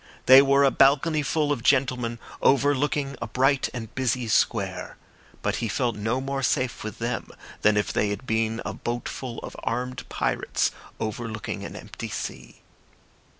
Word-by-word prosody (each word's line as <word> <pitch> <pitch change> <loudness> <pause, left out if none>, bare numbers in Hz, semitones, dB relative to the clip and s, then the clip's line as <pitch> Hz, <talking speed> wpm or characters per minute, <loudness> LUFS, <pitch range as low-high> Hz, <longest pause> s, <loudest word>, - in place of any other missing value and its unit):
They 130 +1 +10
were 140 0 +4
a 135 - +5
balconyful 150 +2 +3
of 140 -5 -1
gentlemen 125 -3 +2 0.2
overlooking 140 0 +2
a 120 - -2
bright 135 +3 +2
and 115 -3 -7
busy 125 -2 0
square; 110 - 0 0.5
but - - 0
he 115 - -1
felt 120 0 0
no 110 +5 -1
more 135 +1 -3
safe 130 -2 0
with 110 +1 -6
them 115 +2 -3 0.3
than 105 0 +4
if 105 - 0
they 105 - +1
had 105 +5 -4
been 110 -1 0
a - - -3
boatful 120 +1 -4
of - - -8
armed 125 +2 -3
pirates - - 0 0.3
overlooking 110 -1 -4
an - - -7
empty - - -7
sea. - - -7
125 Hz, 150 wpm, -25 LUFS, 115-135 Hz, 0.5 s, They